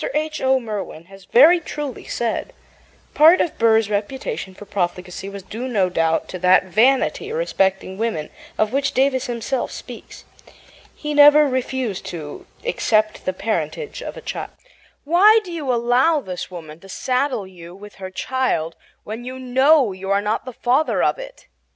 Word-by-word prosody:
H. 310 0 -2
O. 265 0 +3
Merwin 210 -8 -6
has 195 -1 -14
very 315 +9 +6
truly 295 -5 -6
said: 240 - -3 0.6
Part 320 +4 +6
of 335 - -1
Burr's 225 -2 +4
reputation 210 - -4
for 205 - -11
profligacy 180 0 -3
was 200 -1 -9
due, 230 +6 -6
no 200 -7 +1
doubt, 165 -1 +1
to 185 - -6
that 185 +1 +5
vanity 255 - +2
respecting 195 - -1
women 220 -10 -2 0.3
of 215 +2 0
which 280 +1 0
Davis 260 -1 +1
himself 240 +2 -2
speaks. - - -10 0.7
He 300 -1 -4
never 295 +1 +7
refused 255 -5 -2
to 155 -4 -8 0.2
accept 215 - 0
the 185 - -1
parentage 420 - -3
of - - -7
a - - -8
child. - - -5 0.5
"Why 390 +9 +6
do 365 - -9
you 300 -6 -2
allow 245 +7 +3
this 185 -9 -6
woman 160 -3 -10
to 195 - -16
saddle 255 0 -1
you 175 -2 -12
with 205 +1 -13
her 190 - -5
child 185 -7 -2 0.3
when 220 +3 -7
you 255 +1 -7
KNOW 260 0 +3
you 190 +1 -7
are 200 0 +3
not 210 +4 -2
the 255 - -7
father 260 +7 +1
of - - +1
it?" - - -10
235 Hz, 165 wpm, -21 LUFS, 190-280 Hz, 0.7 s, never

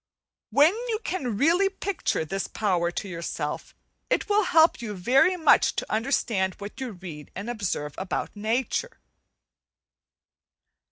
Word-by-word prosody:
When 290 - +5 0.2
you 440 - +1
can 250 - -2
really 345 - +4
picture 385 - -2
this 195 +5 -3
power 180 -5 0
to 185 +3 -5
yourself 170 -4 -5 0.3
it - - +1
will 420 -1 +3
help 320 -6 +4
you 215 -3 -5
very 265 - +3
much 320 - +4
to - - -4
understand 215 -5 0
what 205 +6 -9
you 250 -4 -4
read 170 -5 -9
and 200 +4 -5
observe 180 -10 -3
about 190 +2 -3
nature. 245 - -2
220 Hz, 130 wpm, -26 LUFS, -, 0.3 s, When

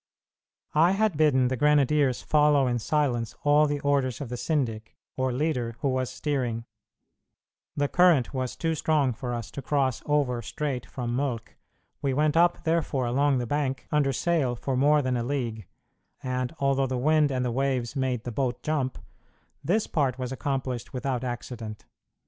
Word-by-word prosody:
I 165 +5 +4
had 215 -2 +1
bidden 135 -4 +3
the 130 - 0
grenadiers 145 -1 +3
follow 150 -2 +4
in 120 -1 0
silence 120 -4 0
all 150 +1 +5
the 145 0 -1
orders 140 -3 +1
of 140 -5 -5
the 125 - -4
syndic, 120 -6 -2 0.2
or 130 0 0
leader, 125 -4 -1
who 140 - +1
was 130 -1 -1
steering; 125 -6 -2 1.1
the 145 0 +2
current 170 -7 +4
was 130 -2 -3
too 165 -1 -1
strong 150 -4 +1
for 120 +2 -5
us 115 -4 -5
to 140 - -6
cross 135 -3 0
over 140 -5 +1
straight 130 +1 -4
from 120 -2 -4
Mölk: 125 -4 -2 0.5
we 135 -2 0
went 150 +1 +2
up, 175 +1 +3
therefore, 160 -5 0
along 135 +3 +2
the 125 - -1
bank 135 +1 -2
under 145 -3 +2
sail 140 -3 0
for 130 +2 -3
more 145 +3 +4
than 130 -1 0
a 120 - -1
league, 120 -6 -3 0.6
and 125 -1 -2
although 135 -1 +1
the 130 0 -2
wind 150 +3 +3
and 130 -2 -1
the 120 - -1
waves 130 -1 -1
made 130 -4 -1
the 120 - -4
boat 125 +1 -2
jump, 145 -4 -1 0.7
this 210 +5 +1
part 135 -5 0
was 130 -1 -4
accomplished 130 -3 -3
without 130 -1 -2
accident. 120 -3 -6
135 Hz, 170 wpm, -27 LUFS, 125-150 Hz, 1.1 s, all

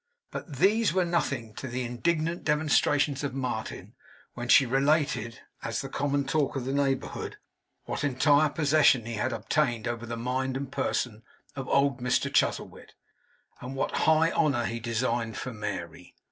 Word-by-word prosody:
But 155 - -7
these 210 - +3
were 185 -1 +2
nothing 135 -10 -1
to 135 - -5
the 125 +1 -3
indignant 160 +7 -1
demonstrations 150 -2 +2
of 140 -2 -3
Martin, 125 -5 -4 0.4
when 120 0 -5
she 135 +2 +7
related, 135 -3 +1 0.2
as - - -2
the - - -6
common 140 0 0
talk 145 0 0
of 130 -2 -3
the 135 - -2
neighbourhood, 140 -1 -1 0.5
what - - -4
entire 145 +2 +3
possession 145 -5 +3
he 115 - -5
had 120 +4 -1
obtained 120 0 0
over 120 0 -4
the 115 0 -4
mind 130 +2 -1
and 135 -1 -5
person 125 -5 -1 0.3
of 135 -2 -5
old 140 -1 +2
Mr 125 0 0
Chuzzlewit, - - -1 0.7
and 125 +2 -6
what 135 - -1
high 160 +1 +4
honour 140 -7 +1
he 115 +1 -3
designed 115 -1 -1
for 130 - -5
Mary. 90 -5 -6
135 Hz, 160 wpm, -28 LUFS, 120-145 Hz, 0.7 s, she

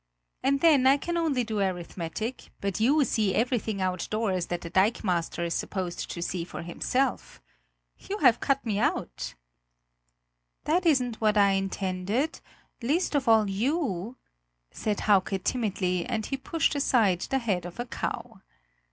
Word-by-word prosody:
And 275 0 +1
then, 290 -6 +5
I 275 +2 +6
can 345 +4 -3
only 310 -7 +1
do 220 -2 -3
arithmetic; 185 +4 -3
but 200 -1 -2
you 280 +7 +4
see 215 -6 +1
everything 230 -3 0
outdoors 185 +1 -1
that 175 0 -3
the 170 - -7
dikemaster 185 -4 +1
is 170 - -1
supposed 185 -3 -3
to 170 - -4
see 175 -1 -2
for 170 - -7
himself. 250 +10 -1 0.6
You 405 - -5
have 240 - +5
cut 275 -1 0
me 210 -3 0
out!" - - -2 1.3
"That 345 +3 +1
isn't 250 -7 +2
what 215 -1 +3
I 200 -1 +5
intended 195 +7 -1 0.4
least 305 +11 0
of 280 -3 0
all 220 -2 +5
you!" 230 - -1 0.5
said 210 -2 -2
Hauke 195 -1 +3
timidly, 190 -7 0
and 220 -1 -2
he 275 - -2
pushed 330 +5 0
aside 225 - +2
the 270 - 0
head 200 -8 -1
of 175 - -12
a 240 - -2
cow. 225 -4 -5
215 Hz, 150 wpm, -27 LUFS, 185-265 Hz, 1.3 s, I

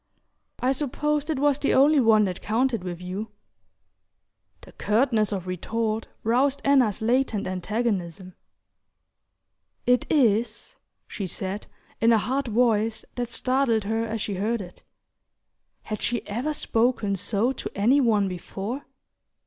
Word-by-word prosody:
"I 255 - +2
supposed 295 +2 -1
it 310 - 0
was 285 0 +2
the 285 - +1
only 285 +3 +5
one 220 -4 +5
that 185 -1 -4
counted 230 -1 0
with 180 -1 -6
you." 190 +4 -4 1.3
The - - -14
curtness 220 -1 +1
of 190 -3 -3
retort 220 +5 -2 0.2
roused 260 +5 +2
Anna's 255 -7 +3
latent 235 -2 +1
antagonism. 185 -2 -2 1.5
"It 250 0 +2
is," 235 -5 +1 0.3
she 200 -4 -5
said, 190 +3 -4 0.3
in 230 +1 +5
a 225 - +6
hard 260 +5 -1
voice 225 -1 +1
that 245 -1 -3
startled 255 -3 +1
her 225 +2 -1
as 225 -1 -3
she 205 - -2
heard 215 +5 -1
it. 180 -3 -10 1.0
Had 215 -1 -5
she 240 -1 -1
ever 250 +9 -2
spoken 225 -5 +1
so 205 +5 0
to 270 - -5
any 245 +8 +4
one 215 -5 +3
before? 195 +8 -5
225 Hz, 135 wpm, -25 LUFS, 205-255 Hz, 1.5 s, a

